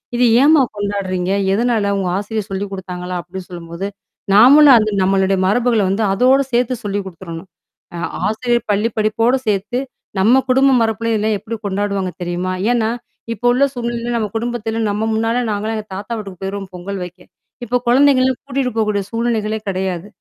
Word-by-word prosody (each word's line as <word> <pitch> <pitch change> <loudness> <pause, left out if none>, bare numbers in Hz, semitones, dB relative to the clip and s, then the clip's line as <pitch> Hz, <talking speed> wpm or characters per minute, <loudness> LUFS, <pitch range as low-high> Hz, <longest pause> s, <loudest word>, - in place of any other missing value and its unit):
இது 245 0 +3 0.2
ஏன்ம்மா 300 0 +6
கொண்டாடுறீங்க? 195 -3 -2 0.2
எதனால 220 -2 +1
உங்க 185 -2 -1
ஆசிரியர் 210 0 -3
சொல்லிக் 195 +1 -3
குடுத்தாங்களா? 180 -1 -5
அப்பிடி 185 +2 -8
சொல்லும்போது 170 +2 -6 0.5
நாமளும் 270 +5 +8
அந்த 215 -1 +2
நம்மளுடைய 190 0 +2
மரபுகள 230 +2 +2
வந்து 210 +3 0
அதோட 255 +6 +4
சேர்த்து 245 +1 +2
சொல்லிக் 200 -1 -2
குடுத்துரணும். 170 -1 -9 0.5
அ - - -5 0.3
ஆசிரியர் 235 +2 0
பள்ளி 210 +3 +1
படிப்போட 225 +4 +2
சேர்த்து, 210 +4 0 0.4
நம்ம 245 +7 +5
குடும்ப 265 +1 +4
மரபுல 225 +1 0
இதெல்லாம் 215 0 +1
எப்பிடி 220 +2 -6
கொண்டாடுவாங்க 200 -1 -1
தெரியுமா? 175 +1 -2 0.2
ஏன்னா, 225 -2 +1 0.4
இப்போ 230 +3 -8
உள்ள 265 +3 +2
சூழ்நிலையில 240 -1 -3
நம்ம 215 -2 -1
குடும்பத்தில 225 -1 -2
நம்ம 210 +2 -1
முன்னால 225 +2 0
நாங்களாம் 215 +2 -2
எங்க 215 0 -6
தாத்தா 205 +4 -5
வீட்டுக்கு 195 -4 -8
போயிருவோம் 195 0 -5
பொங்கல் 195 +2 -5
வைக்க. 180 +1 -10 0.5
இப்ப 245 +2 0
குழந்தைங்கலாம் 260 0 +4
கூட்டிட்டு 270 -2 -1
போக்கூடிய 210 -2 +1
சூழ்நிலைகளே 225 -2 -1
கிடையாது. 185 -1 -3
215 Hz, 155 wpm, -18 LUFS, 195-240 Hz, 0.5 s, நாமளும்